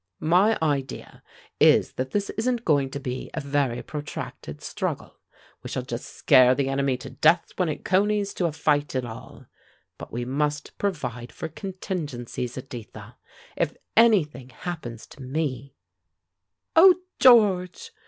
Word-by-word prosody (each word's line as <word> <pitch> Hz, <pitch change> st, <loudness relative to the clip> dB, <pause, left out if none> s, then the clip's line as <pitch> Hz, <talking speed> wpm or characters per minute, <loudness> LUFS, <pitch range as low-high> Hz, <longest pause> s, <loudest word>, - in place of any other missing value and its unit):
My 185 Hz, +8 st, +3 dB
idea 140 Hz, -4 st, -3 dB, 0.4 s
is -, -, +5 dB
that 130 Hz, +1 st, -3 dB
this 200 Hz, +4 st, -1 dB
isn't 240 Hz, +1 st, -1 dB
going 140 Hz, -4 st, +2 dB
to 140 Hz, -, -5 dB
be 130 Hz, -2 st, -5 dB
a -, -, -1 dB
very 140 Hz, -4 st, -1 dB
protracted 145 Hz, -, -7 dB
struggle; -, -, -5 dB, 0.4 s
we -, -, -8 dB
shall -, -, -3 dB
just -, -, -7 dB
scare 130 Hz, 0 st, +6 dB
the 135 Hz, 0 st, 0 dB
enemy 135 Hz, -1 st, 0 dB
to -, -, -9 dB
death 165 Hz, +3 st, +3 dB
before 180 Hz, -3 st, -1 dB
it -, -, -8 dB
conies 200 Hz, +1 st, +1 dB
to 175 Hz, -, 0 dB
a -, -, -2 dB
fight 145 Hz, -2 st, 0 dB
at 130 Hz, -1 st, -1 dB
all. 115 Hz, +1 st, -10 dB, 0.5 s
But -, -, -9 dB
we 120 Hz, +1 st, -3 dB
must 145 Hz, +3 st, -2 dB
provide 125 Hz, -, -3 dB
for 160 Hz, -, -6 dB
contingencies, 150 Hz, -, -5 dB
Editha. 125 Hz, -3 st, -9 dB, 0.4 s
If -, -, -1 dB, 0.2 s
anything 155 Hz, -, +3 dB
happens 120 Hz, -3 st, -7 dB
to 145 Hz, -, -15 dB
me 135 Hz, 0 st, -3 dB, 0.5 s
" 90 Hz, +1 st, -58 dB
"Oh, 360 Hz, +3 st, +8 dB, 0.2 s
George!" 215 Hz, -, +4 dB
145 Hz, 145 wpm, -25 LUFS, 130-185 Hz, 0.5 s, Oh